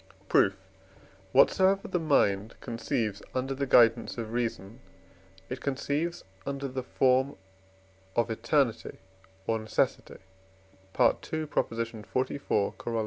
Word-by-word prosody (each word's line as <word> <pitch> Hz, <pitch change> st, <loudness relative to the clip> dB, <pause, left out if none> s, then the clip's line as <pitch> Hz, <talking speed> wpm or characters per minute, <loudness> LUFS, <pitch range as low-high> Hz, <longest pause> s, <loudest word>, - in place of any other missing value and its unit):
Proof. 100 Hz, -, +4 dB, 0.8 s
Whatsoever 190 Hz, -, +4 dB
the 180 Hz, -, -1 dB
mind 110 Hz, -10 st, +2 dB
conceives 110 Hz, -3 st, -2 dB
under 130 Hz, +1 st, -1 dB
the 140 Hz, +1 st, -2 dB
guidance 115 Hz, -1 st, +4 dB
of 115 Hz, -1 st, -5 dB
reason, 115 Hz, -4 st, -3 dB, 0.7 s
it 130 Hz, +4 st, -6 dB
conceives 145 Hz, +5 st, -2 dB, 0.2 s
under 140 Hz, 0 st, -3 dB
the 130 Hz, 0 st, -4 dB
form 130 Hz, +2 st, +2 dB, 0.8 s
of 120 Hz, 0 st, +1 dB
eternity 120 Hz, +2 st, 0 dB, 0.5 s
or 110 Hz, +1 st, 0 dB
necessity 110 Hz, 0 st, -1 dB, 0.8 s
(II. -, -, +7 dB
xliv. 115 Hz, -5 st, -2 dB
Coroll. 115 Hz, -1 st, -3 dB
125 Hz, 100 wpm, -29 LUFS, 115-140 Hz, 0.8 s, II